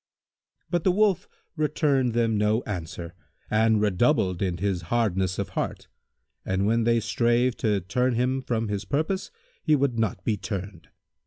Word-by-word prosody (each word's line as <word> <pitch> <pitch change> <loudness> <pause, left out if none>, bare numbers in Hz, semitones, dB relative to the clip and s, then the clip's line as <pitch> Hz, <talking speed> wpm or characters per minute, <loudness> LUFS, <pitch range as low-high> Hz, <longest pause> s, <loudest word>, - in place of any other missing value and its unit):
But 175 -2 +1
the 185 - +4
Wolf 200 -1 +2 0.3
returned 145 -5 +1
them 115 -1 +1
no 105 +3 +1
answer 85 -3 -6 0.4
and 110 0 +3
redoubled 105 - +2
in 90 -3 0
his 95 -1 -1
hardness 95 -6 +1
of - - -3
heart - - -4 0.5
and 95 +1 0
when 115 +2 +2
they 115 0 +3
strave 120 +2 +1
to 105 -3 +1
turn 125 +7 0
him 130 +3 0
from 115 -3 -1
his 105 -1 -2
purpose 155 - -1 0.3
he 155 - +3
would 135 -4 0
not 100 -5 -1
be 110 - +1
turned. 100 0 -6
115 Hz, 155 wpm, -26 LUFS, 100-130 Hz, 0.5 s, the